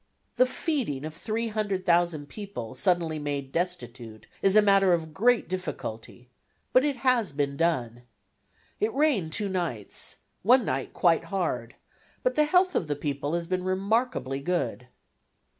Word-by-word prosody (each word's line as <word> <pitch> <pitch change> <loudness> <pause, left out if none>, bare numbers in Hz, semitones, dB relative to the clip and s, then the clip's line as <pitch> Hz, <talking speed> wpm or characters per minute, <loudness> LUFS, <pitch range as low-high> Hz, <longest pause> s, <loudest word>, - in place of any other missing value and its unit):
The 255 - +5
feeding 250 - -2
of 155 - -6
300,000 185 -6 0
people 195 - -7
suddenly 170 -5 +1
made 140 -2 -3
destitute 120 -11 -4 0.2
is 195 +1 +3
a 215 - +8
matter 195 -2 +5
of 160 -2 -2
great 235 +5 +3
difficulty, 125 -9 -6 0.4
but 255 - +6
it 290 -2 +1
has 245 - +2
been 140 -1 -1
done. 130 -8 0 0.8
It 215 +2 +1
rained 270 - +2
two 205 +5 0
nights, 170 - -3 0.3
one 245 +3 +5
night 130 0 -2
quite 170 -2 +3
hard, 160 -12 -2 0.5
but - - +2
the 300 - +3
health 365 +4 +3
of 165 - 0
the 145 - -1
people 145 +1 -2
has 170 0 -2
been 185 +1 -2
remarkably 190 - 0
good. 140 -6 -2
175 Hz, 140 wpm, -27 LUFS, 145-215 Hz, 0.8 s, a